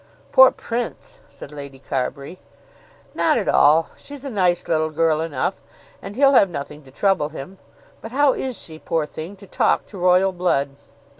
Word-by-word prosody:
"Poor 260 0 +8
Prince!" 245 - -6
said 140 - -12
Lady 140 -2 -9
Carbury. 140 +5 -4 0.7
"Not - - +2
at - - -2
all. 160 +3 +4
She's 285 -1 -11
a 275 - -5
nice 180 -5 +1
little 155 -1 +1
girl 155 0 +1
enough, 165 +3 -2 0.4
and 200 - -8
he'll 275 +2 +4
have 200 -7 +5
nothing 150 -2 -7
to - - -15
trouble 185 +1 0
him. 160 +5 -10 0.4
But 225 - -8
how 280 +1 +3
is 260 -3 -4
she, 160 -1 -9
poor 165 -2 -1
thing, 160 +6 -8
to 200 - -15
talk 185 - +1
to 200 - -11
royal 180 +2 +4
blood?" 175 -6 0
175 Hz, 170 wpm, -21 LUFS, 150-205 Hz, 0.7 s, Poor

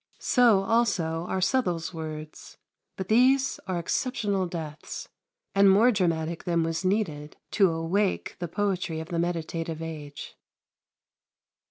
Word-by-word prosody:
So 235 -6 +4
also 180 -7 +1
are 190 - -1
Southwell's 180 -7 0
words. 155 -1 -8 0.4
But 190 - -4
these 255 +5 +3
are 185 -2 -1
exceptional 200 +1 -1
deaths, 155 -4 -6 0.5
and 200 0 +6
more 215 +6 +6
dramatic 170 -5 -1
than 170 -2 +1
was 165 +2 -2
needed 175 -7 -1
to 195 -3 +4
awake 170 +5 -1
the 175 - -3
poetry 185 -3 -1
of 160 +1 -7
the 170 -2 -1
meditative 165 -1 -2
age. 155 -3 -7
175 Hz, 125 wpm, -27 LUFS, 160-200 Hz, 0.5 s, and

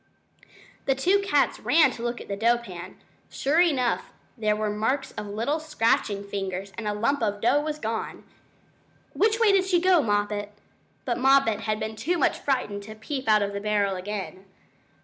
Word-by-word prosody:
The 270 - +3
two 365 +10 +3
cats 295 -9 +1
ran 315 0 +4
to 230 - -9
look 240 0 -3
at - - -10
the 200 - -3
dough 230 +4 +3
pan. 185 -5 -9 0.3
Sure 300 +5 +2
enough 270 -9 +1 0.3
there 215 -3 +1
were 210 0 -1
marks 240 +7 -1
of 210 - -6
little 230 +10 -1
scratching 225 -9 0
fingers, 195 -1 -5
and 215 +2 -5
a 210 - 0
lump 260 +7 0
of 205 -2 -1
dough 245 +7 +3
was 305 0 -3
gone! 225 -4 -4 0.9
"Which 435 +2 +2
way 455 -3 +5
did 390 -1 +4
she 365 -2 +2
go, 365 -2 +4
Moppet?" 205 -2 -1 0.5
But 245 -2 -1
Moppet 270 -5 +4
had 215 0 -2
been 220 0 -4
too 305 +12 -1
much 295 - +1
frightened 250 -7 -1
to 215 +2 -10
peep 260 +4 -5
out 215 -1 +5
of 200 0 -3
the 200 - -4
barrel 205 -2 +1
again. 190 0 -6
225 Hz, 185 wpm, -26 LUFS, 205-285 Hz, 0.9 s, way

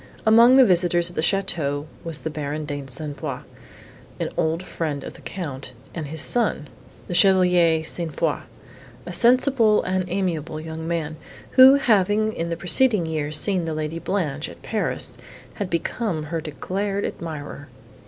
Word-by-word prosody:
Among 230 +3 +7
the 265 -1 +8
visitors 175 -2 +3
at - - -16
the - - 0
château 160 -6 -1 0.2
was 165 -3 -4
the 160 - -4
Baron 150 0 -4
de 145 -1 -5
Saint 145 +2 -5
Foix, - - -4 0.8
an - - -1
old 160 +3 0
friend 155 -5 -4
of - - -8
the - - -15
Count, 140 -8 -6 0.2
and 160 -4 -5
his 155 +1 -1
son, 225 -10 0 0.4
the - - -4
Chevalier 180 -4 +4
St. 165 0 -1
Foix, - - 0 0.7
a - - -6
sensible 240 -3 +4
and 185 0 -1
amiable 170 -5 -2
young 160 0 -6
man, 160 -2 -3 0.3
who, 260 +1 +9
having 215 -4 +2
in 170 -3 -3
the 170 - -3
preceding 205 +1 +3
year 155 -2 -3
seen 180 +2 +1
the 160 -1 -3
Lady 155 +1 -3
Blanche, 155 -7 -2
at - - -14
Paris, 220 - -2 0.3
had 200 -4 -4
become 170 0 -2
her 160 +2 -4
declared 195 +7 -3
admirer. 145 -3 -6
170 Hz, 160 wpm, -23 LUFS, 155-195 Hz, 0.8 s, who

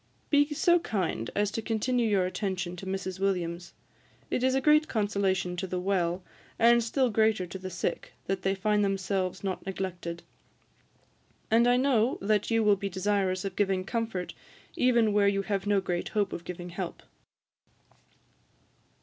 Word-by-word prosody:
Be 290 0 +4
so 345 +4 +3
kind 185 - -2
as 205 0 +1
to 225 - -3
continue 230 +1 0
your 195 -3 +2
attention 185 -2 -3
to 190 +2 -8
Mrs. 190 -1 -4
Williams; 175 -3 -2 0.6
it - - 0
is 260 +1 +2
great 305 +2 +4
consolation 195 -4 0
to 190 +1 -3
the 180 0 -2
well, 180 -1 0 0.3
and 235 +1 +5
still 250 +2 +1
greater 220 -3 +2
to 180 +2 -8
the 185 0 -6
sick, 180 0 -3
that 195 0 -2
they 195 0 0
find 210 +2 +1
themselves 195 -1 -1
not 190 -2 -3
neglected; 180 -3 -5 1.3
and 230 +2 +5
I 245 0 +4
know 255 -3 +2
that 210 +1 +1
you 225 -1 +2
will 205 -1 +4
be 200 +1 -3
desirous 190 0 0
of 195 -2 -4
giving 195 -2 +1
comfort 225 -4 -3 0.4
even 235 -4 +3
where 205 -1 +4
you 195 0 +1
have 200 -1 -2
no 205 -1 +3
great 175 -2 -3
hope 205 -2 0
of 170 - -6
giving 175 0 -6
help. 175 0 -6
195 Hz, 160 wpm, -28 LUFS, 185-225 Hz, 1.3 s, and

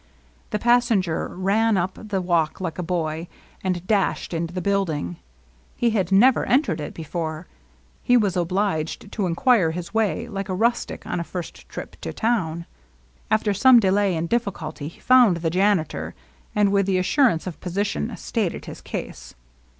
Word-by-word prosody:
The 215 - -1
passenger 230 -7 +2
ran 205 +4 +1
up 185 +1 0 0.2
the 195 -3 -1
walk 170 -3 +1
like 180 -3 -4
a - - 0
boy, 165 -2 -2 0.4
and 185 -2 -2
dashed 200 -3 0
into 165 0 -2
the 185 - -3
building. 170 - -1 0.6
He 235 -1 +2
had 195 -4 0
never 240 +7 +5
entered 215 - +1
it 150 - -6
before. 160 0 -4 0.6
He 245 - +4
was 205 -5 +1
obliged 180 0 -1
to 200 -4 -1
inquire 190 +1 +3
his 170 +3 -6
way, 225 +1 0
like 195 -3 -5
a 185 - -1
rustic 235 +5 0
on - - -2
a - - -2
first 175 0 -8
trip - - -8
to - - -4
town. 170 -8 -1 0.6
After 215 -1 +2
some 245 +5 +7
delay 195 -2 +2
and 165 +1 -2
difi&culty 165 -10 -3
he - - -18
found 245 -8 +5
the 165 -1 -1
janitor, 160 - 0 0.4
and, 205 -1 +3
with 200 -1 +2
the 190 -1 +2
assur 240 +9 +4
ance 165 -6 -3
of 180 -3 -6
position, 180 - -2
stated - - -2
his - - -9
case. - - -7
185 Hz, 165 wpm, -23 LUFS, 165-210 Hz, 0.6 s, some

